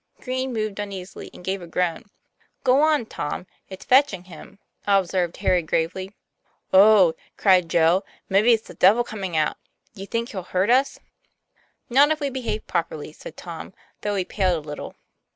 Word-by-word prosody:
Green 260 Hz, +1 st, -3 dB
moved 215 Hz, -3 st, -3 dB
uneasily, 195 Hz, -2 st, -7 dB
and 180 Hz, -, -13 dB
gave 190 Hz, 0 st, -2 dB
a 175 Hz, -, -9 dB
groan. 170 Hz, 0 st, -1 dB, 0.6 s
"Go 265 Hz, +1 st, +4 dB
on, 305 Hz, -5 st, +3 dB
Tom, 180 Hz, -4 st, -5 dB, 0.2 s
it's 190 Hz, -, -10 dB
fetching 255 Hz, -9 st, +3 dB
him," 180 Hz, +1 st, -13 dB, 0.3 s
observed 185 Hz, -3 st, +1 dB
Harry 180 Hz, -1 st, +2 dB
gravely. 185 Hz, +5 st, -2 dB, 0.6 s
"Oh!" 195 Hz, -3 st, +7 dB, 0.2 s
cried 185 Hz, -4 st, +4 dB
Joe, 170 Hz, +4 st, +3 dB, 0.2 s
"maybe 205 Hz, +5 st, +4 dB
it's 225 Hz, -1 st, +1 dB
the -, -, -10 dB
devil 215 Hz, +6 st, +4 dB
coming 195 Hz, -7 st, -4 dB
out. 155 Hz, -1 st, +1 dB, 0.4 s
Do 200 Hz, -, -11 dB
you 195 Hz, -, -7 dB
think 230 Hz, +2 st, -2 dB
he'll 190 Hz, -, -5 dB
hurt 185 Hz, +4 st, 0 dB
us?" 265 Hz, +3 st, +2 dB, 0.9 s
"Not 275 Hz, +4 st, +5 dB
if 310 Hz, 0 st, 0 dB
we 285 Hz, -2 st, -2 dB
behave 230 Hz, -5 st, -4 dB
properly," 155 Hz, -2 st, -3 dB
said -, -, -11 dB
Tom, 170 Hz, +2 st, -9 dB, 0.3 s
though 205 Hz, -1 st, -1 dB
he 190 Hz, -2 st, -1 dB
paled 180 Hz, -7 st, 0 dB
a -, -, -16 dB
little. 150 Hz, -, -7 dB
195 Hz, 170 wpm, -23 LUFS, 180-230 Hz, 0.9 s, Oh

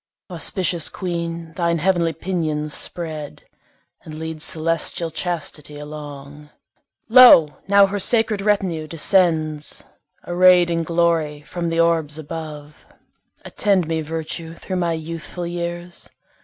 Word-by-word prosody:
Auspicious 175 Hz, 0 st, 0 dB
queen, 170 Hz, -2 st, -5 dB
thine 170 Hz, -2 st, 0 dB
heav'nly 170 Hz, -1 st, +1 dB
pinions 155 Hz, -4 st, -2 dB
spread, 155 Hz, -4 st, -4 dB, 0.6 s
And 155 Hz, -1 st, -10 dB
lead 160 Hz, -1 st, -6 dB
celestial 165 Hz, +1 st, 0 dB
Chastity 155 Hz, -3 st, -4 dB
along; 150 Hz, -1 st, -9 dB, 0.6 s
Lo! 220 Hz, -, +8 dB
now 200 Hz, 0 st, +6 dB
her 200 Hz, +1 st, -3 dB
sacred 220 Hz, -1 st, +2 dB
retinue 190 Hz, -6 st, 0 dB
descends, 160 Hz, -2 st, +1 dB, 0.4 s
Array'd 180 Hz, 0 st, +5 dB
in 165 Hz, 0 st, 0 dB
glory 165 Hz, -3 st, 0 dB
from 170 Hz, +2 st, -4 dB
the 165 Hz, 0 st, -1 dB
orbs 165 Hz, -3 st, +1 dB
above. 150 Hz, -1 st, -8 dB, 0.6 s
Attend 195 Hz, -5 st, +1 dB
me, 160 Hz, -1 st, -1 dB
Virtue, 160 Hz, +1 st, -6 dB
thro' 185 Hz, -, -6 dB
my 175 Hz, -2 st, 0 dB
youthful 165 Hz, +2 st, -6 dB
years! 175 Hz, 0 st, -5 dB
165 Hz, 115 wpm, -21 LUFS, 155-175 Hz, 0.6 s, Lo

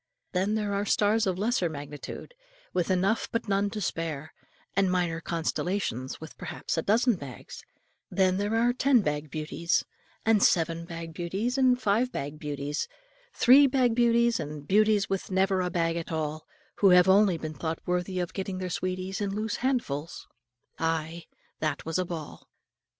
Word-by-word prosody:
Then 190 Hz, +4 st, +1 dB
there 210 Hz, -2 st, -1 dB
are 200 Hz, 0 st, 0 dB
stars 210 Hz, +1 st, +2 dB
of 185 Hz, -1 st, 0 dB
lesser 205 Hz, -3 st, +1 dB
magnitude, 145 Hz, -, -8 dB, 0.4 s
with 180 Hz, -2 st, 0 dB
enough 190 Hz, +4 st, +1 dB
but 230 Hz, -, -2 dB
none 200 Hz, 0 st, +1 dB
to 215 Hz, -, -5 dB
spare; 160 Hz, -5 st, -3 dB, 0.4 s
and 195 Hz, -1 st, +3 dB
minor 175 Hz, -3 st, 0 dB
constellations, 165 Hz, -, -2 dB
with 160 Hz, -, -10 dB
perhaps -, -, -4 dB
a 160 Hz, -, 0 dB
dozen 225 Hz, +4 st, +3 dB
bags; 135 Hz, -, -9 dB, 0.5 s
and 185 Hz, -1 st, +2 dB
there 205 Hz, +2 st, 0 dB
are 240 Hz, +2 st, +3 dB
ten 260 Hz, -1 st, +4 dB
bag 150 Hz, -3 st, -2 dB
beauties, 160 Hz, +2 st, -1 dB, 0.4 s
and 220 Hz, -2 st, +4 dB
seven 165 Hz, -2 st, +2 dB
bag 165 Hz, -1 st, -7 dB
beauties, 195 Hz, +9 st, -2 dB
and 255 Hz, -2 st, +4 dB
five 235 Hz, +3 st, +1 dB
bag 145 Hz, +2 st, -5 dB
beauties, 145 Hz, -1 st, -3 dB, 0.5 s
three 275 Hz, +3 st, +7 dB
bag 255 Hz, -3 st, +2 dB
beauties, 235 Hz, 0 st, +3 dB
and 150 Hz, -1 st, -6 dB
beauties 210 Hz, 0 st, +3 dB
with 195 Hz, -1 st, -3 dB
never 190 Hz, 0 st, +2 dB
a 180 Hz, -, -1 dB
bag 165 Hz, -1 st, 0 dB
at 170 Hz, -, -5 dB
all, 155 Hz, -1 st, -3 dB, 0.3 s
who 200 Hz, -, +5 dB
have 180 Hz, 0 st, +6 dB
only 190 Hz, -2 st, +5 dB
been 155 Hz, -1 st, -5 dB
thought 160 Hz, +1 st, -3 dB
worthy 180 Hz, +1 st, -1 dB
of 175 Hz, -1 st, -3 dB
getting 190 Hz, -1 st, -4 dB
their 185 Hz, -1 st, -4 dB
sweeties 185 Hz, +2 st, -3 dB
in 200 Hz, -, 0 dB
loose 215 Hz, +2 st, -2 dB
handfuls. 180 Hz, -, -2 dB, 0.5 s
Ay, 165 Hz, +1 st, -2 dB, 0.3 s
that 155 Hz, -, -2 dB
was 165 Hz, +2 st, -1 dB
a 185 Hz, -, 0 dB
ball. 165 Hz, -4 st, -7 dB
185 Hz, 165 wpm, -28 LUFS, 165-210 Hz, 0.5 s, three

